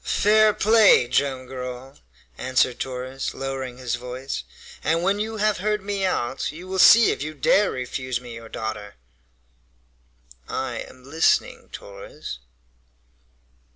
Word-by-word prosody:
"Fair 215 +1 +4
play, 215 - +5
Joam 130 0 0
Garral," 125 +1 -8 0.4
answered 130 - +1
Torres, 130 +1 -4
lowering 135 -2 -5
his 125 -2 -4
voice, 125 +2 -5 0.4
"and 165 +2 +1
when 195 +2 +1
you 220 +1 -3
have 210 -1 +1
heard 210 0 -1
me 200 -1 -2
out, 135 -9 -1
you 170 +4 -10
will 190 0 -3
see 230 +4 +8
if - - -4
you 155 +1 -5
dare 200 +8 +3
refuse 125 0 -4
me 120 -1 -10
your 115 -1 -10
daughter!" 110 -2 -6 1.5
"I - - -3
am 130 0 -17
listening, 155 +5 +1
Torres." - - -9
135 Hz, 130 wpm, -23 LUFS, 125-195 Hz, 1.5 s, see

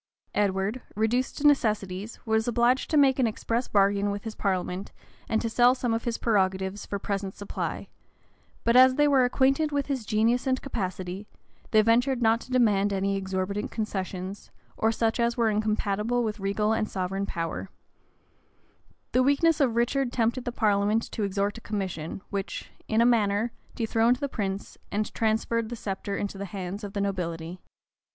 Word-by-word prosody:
Edward, 200 +4 0
reduced 225 +4 0
to 290 - -3
necessities, 215 -7 +1
was 220 0 +1
obliged 240 +2 +2
to 310 - +2
make 270 -2 +5
an 250 - +4
express 230 +2 -2
bargain 200 0 +2
with 200 0 -4
his 225 - -5
parliament 190 -1 -2 0.4
and 220 - +2
to - - 0
sell 245 +2 +4
some 245 -3 -1
of 225 - -2
his 235 -1 -1
prerogatives 190 -2 0
for 200 - -2
present 195 -1 -3
supply; 205 - -4 0.8
but 235 - +2
as 255 0 +7
they 295 +1 +4
were 270 -3 +4
acquainted 270 +4 +2
with 285 -1 0
his 270 -5 -2
genius 225 +4 +1
and 260 0 +2
capacity, 190 -5 -4 0.4
they 215 -1 +5
ventured 245 +3 +3
not 230 0 +3
to - - -12
demand 210 -6 +3
any 195 0 0
exorbitant 190 +1 -2
concessions, 190 -3 -4 0.3
or 225 - +2
such 225 +1 0
as 235 +1 +1
were 230 -2 +3
incompatible 215 +2 0
with 215 -1 -3
regal 205 +2 0
and 215 -1 -1
sovereign 195 +1 -2
power: 165 +3 -4 1.4
the 255 - +3
weakness 285 +4 +3
of 245 -5 +2
Richard 240 +2 +1
tempted 240 +2 0
the 245 - -2
parliament 210 -1 +1
to - - -4
extort 200 +2 -1
a - - -24
commission, 190 -6 -4
which, 200 -2 -4 0.2
in 220 +1 +2
a - - +5
manner, 220 -1 +2 0.2
dethroned 230 +1 +2
the 280 +3 -3
prince, 200 -6 -4
and 210 +1 -2
transferred 225 0 0
the 240 - -4
sceptre 200 -2 -4
into 200 -1 -4
the 200 - -3
hands 195 +1 -6
of 200 -1 -6
the 200 - -1
nobility. 175 -3 -3
215 Hz, 170 wpm, -27 LUFS, 195-240 Hz, 1.4 s, as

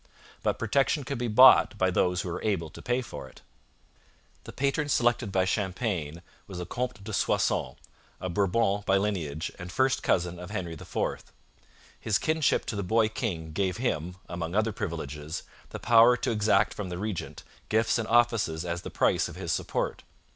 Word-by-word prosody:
But - - 0
protection 140 +2 +1
could 135 -1 -4
be 120 - -1
bought 120 -1 +7
by 95 -2 +2
those 90 0 +1
who 90 - -5
were 85 - -4
able 90 -8 -1
to - - -11
pay 125 +1 0
for 65 - -8
it. - - -18 1.0
The - - -8
patron 140 +2 -1
selected 120 -5 +2
by 95 -1 +2
Champlain 90 -5 -2 0.2
was 95 - -8
the 90 - -4
Comte 125 +1 -4
de 110 +1 -6
Soissons, 65 -8 +1 0.4
a 95 - -4
Bourbon 100 +2 +1
by 95 - +4
lineage 85 -7 -2
and 90 -1 -7
first 130 +4 +1
cousin 85 -1 0
of 90 0 -8
Henry 95 -5 -4
IV. 80 - -4 0.7
His 110 -1 +1
kinship 155 -2 +1
to - - -4
the 100 - -2
boy 110 +4 +2
king 85 -9 -4
gave 95 +3 -1
him, 90 - -2
among 85 0 -4
other 110 +1 +2
privileges, 80 -6 -5 0.3
the - - -6
power 120 +1 +6
to 115 - -1
exact 105 -1 +2
from 100 -3 -5
the 90 - -4
regent 105 -1 -5 0.3
gifts 110 +2 +2
and 110 - -3
offices 115 -9 +2
as 85 0 -3
the - - -7
price - - +2
of - - -10
his - - -4
support. - - -2
100 Hz, 180 wpm, -28 LUFS, 85-115 Hz, 1.0 s, bought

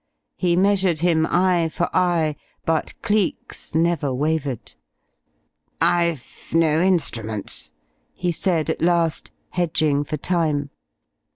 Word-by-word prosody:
He 175 -2 +1
measured 190 -3 +2
him, 165 -2 +3
eye 175 -2 +2
for 175 +2 -1
eye, 170 -4 +2 0.3
but 160 -1 -1
Cleek's 205 -6 -1
never 165 -3 +1
wavered. 145 -2 -2 1.1
"I've 170 -6 0
no 160 -1 +3
instruments," 115 - 0 0.4
he 175 -1 -1
said 165 -2 0
at - - -5
last, 170 -1 +1 0.2
hedging 155 -4 +1
for 155 +1 -4
time. 150 -4 0
165 Hz, 105 wpm, -22 LUFS, 155-175 Hz, 1.1 s, him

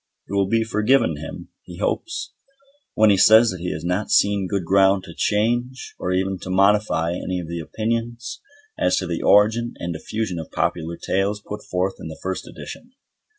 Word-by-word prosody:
It - - -8
will 100 -1 +2
be 115 +2 +2
forgiven 110 - +2
him, 80 - -8
he 90 -1 -11
hopes, 335 - -3 0.6
when 110 -1 +5
he 100 - +4
says 110 +3 +7
that 90 - -7
he 90 +1 -3
has 80 +2 -5
not 90 +4 -1
seen 100 -2 +3
good 95 -2 -2
ground 95 +1 +4
to 85 -3 -10
change 120 +7 -1
or 90 - -2
even 95 0 0
to 90 - -8
modify 100 -3 +2
any 90 +1 -3
of 85 - -6
the 85 +1 -4
opinions 115 - -3 0.4
as - - +2
to - - -1
the - - -3
origin 110 +4 +3
and 85 0 -4
diffusion 95 +2 -3
of 80 - -7
popular 85 0 -2
tales 100 +2 -1
put 105 0 -7
forth 90 +1 -2
in - - -7
the 80 - -8
first 95 0 -4
edition. 245 +1 -10
100 Hz, 190 wpm, -22 LUFS, 90-110 Hz, 0.6 s, says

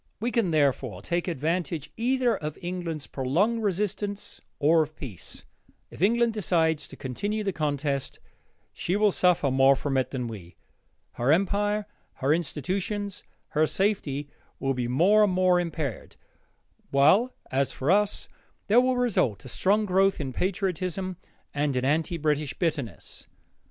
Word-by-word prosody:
We 235 +3 -1
can, 230 -7 +1
therefore, 135 - +1
take 175 +1 -1
advantage 165 -1 -2
either 245 0 +1
of 155 -4 -5
England's 175 -4 -4
prolonged 180 - 0
resistance 205 0 -2 0.2
or 160 +2 +4
of 155 0 -4
peace. 115 - -8 0.5
If - - -11
England 235 +3 +3
decides 160 -7 +1
to - - -11
continue 205 - -3
the 195 -2 -1
contest, 145 -3 -2 0.5
she 180 - -1
will 210 0 +4
suffer 180 -7 +2
more 135 +1 +5
from 135 0 -1
it 130 - +1
than 125 -3 -3
we. 95 -7 -9 0.6
Her 125 +4 +1
empire, 205 +4 +1 0.3
her 135 +3 +1
institutions, 185 - -3 0.3
her 155 +1 +2
safety, 150 -9 0 0.3
will 135 0 0
be 125 -2 -2
more 185 - +4
and 200 -3 +2
more 180 -1 +4
impaired, 160 - -4 0.7
while, 170 - +4 0.2
as 135 +1 +1
for 135 +6 0
us, 205 +1 +2 0.4
there 230 +4 +5
will 255 0 +1
result 185 - +1
a - - -6
strong 205 - +2
growth 195 0 +2
in 135 -3 -4
patriotism 185 - -2 0.4
and 145 -1 0
in 125 0 0
anti 160 +5 +1
British 150 -2 0
bitterness. 150 - -3
170 Hz, 145 wpm, -27 LUFS, 140-200 Hz, 0.7 s, more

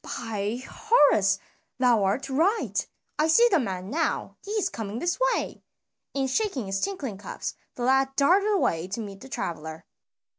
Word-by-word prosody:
"By 225 +2 -3
Horus! 250 - +4 0.4
thou 245 -5 +4
art 195 +8 0
right, 335 +12 +1 0.3
I 305 - +4
see 465 +10 +6
the 370 - +5
man 190 -5 -4
now, 325 +3 -1
he 405 - -11
is 425 -3 +1
coming 215 -1 -5
this 345 - -1 0.2
way." - - -4 0.5
And 270 -1 +1
shaking 275 - -1
his 195 0 -2
tinkling 275 - -3
cups, - - -5 0.2
the 245 - -4
lad 265 +1 +3
darted 375 +10 +4
away 175 - +1
to 200 +5 -4
meet 200 -3 -7
the 265 - -11
traveler. 160 -6 -5
255 Hz, 160 wpm, -26 LUFS, 200-330 Hz, 0.5 s, see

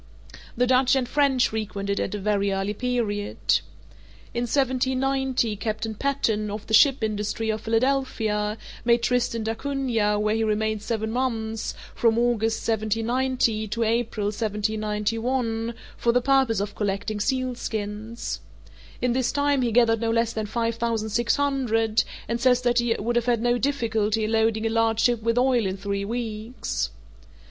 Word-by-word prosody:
The 250 - +3
Dutch 255 +1 +4
and 260 -2 0
French 270 -2 +2
frequented 200 -2 -3
it - - +1
at 200 - -4
a - - -2
very 200 0 0
early 195 +1 -1
period. 215 -3 -2 1.0
In 240 0 -1
1790, 260 -2 +1
Captain 215 +1 -3
Patten, 220 -4 0
of 210 +1 -5
the 220 - -6
ship 265 +2 +6
Industry, 215 +1 -1
of 215 0 -4
Philadelphia, 225 -3 0 0.3
made 235 0 +3
Tristan 235 -2 +1
d'Acunha, 225 -3 0
where 210 0 +1
he 225 0 +1
remained 215 0 0
seven 220 0 -2
months 225 -3 -2 0.2
(from 230 -1 +2
August, 225 -2 +1
1790, 225 +1 0
to 230 +3 -1
April, 225 -2 0
1791) 225 +3 -1 0.2
for 235 - +2
the 250 - +3
purpose 265 -4 +2
of 205 +1 -3
collecting 205 +1 -2
sealskins. 225 -3 -3 0.6
In 250 -1 +2
this 255 -1 +1
time 285 -1 +1
he 240 -2 +1
gathered 225 -1 +3
no 230 - 0
less 230 0 +1
than 215 -1 -3
five 230 +1 -1
thousand 230 -2 -1
six 235 +2 +1
hundred, 240 -6 +1 0.2
and 235 0 -2
says 250 -1 +4
that 240 -1 +2
he 240 -1 +1
would 235 +3 -1
have 240 0 0
had 235 -2 +2
no 240 0 +2
difficulty 225 -6 0
in 215 - -1
loading 220 0 +2
a - - +2
large 225 0 +1
ship 240 -1 +2
with 230 +2 0
oil 250 -4 +3
in 190 +1 -3
three 200 0 -3
weeks. 225 +1 -3
225 Hz, 155 wpm, -25 LUFS, 215-245 Hz, 1.0 s, ship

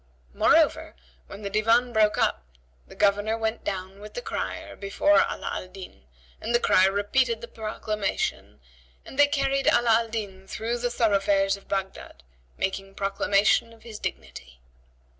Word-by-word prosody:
Moreover, - - +3 0.3
when 210 - -10
the 200 - -3
Divan 230 +4 +2
broke 215 -1 +3
up, - - +1 0.4
the - - -14
Governor 205 +2 +2
went 225 0 -2
down 190 0 -5
with 210 +1 -11
the - - -3
crier - - -5
before 205 +10 +2
Ala - - -5
Al - - -5
Din!" 185 - -12 0.4
and 235 +2 -1
the - - +4
crier 190 -4 +4
repeated 225 +4 +1
the 235 - -8
proclamation 215 -2 -3 0.5
and 270 - -10
they 290 - +7
carried 275 -1 0
Ala 240 -1 +4
al 230 - -7
Din 195 -4 -6
through 230 +4 -3
the 245 0 -1
thoroughfares 200 -4 +2
of 200 - -16
Baghdad, 195 - -5 0.3
making 195 0 -3
proclamation 200 +3 +2
of 225 - -19
his 220 -3 -9
dignity. 60 0 -7
210 Hz, 155 wpm, -26 LUFS, 195-230 Hz, 0.5 s, they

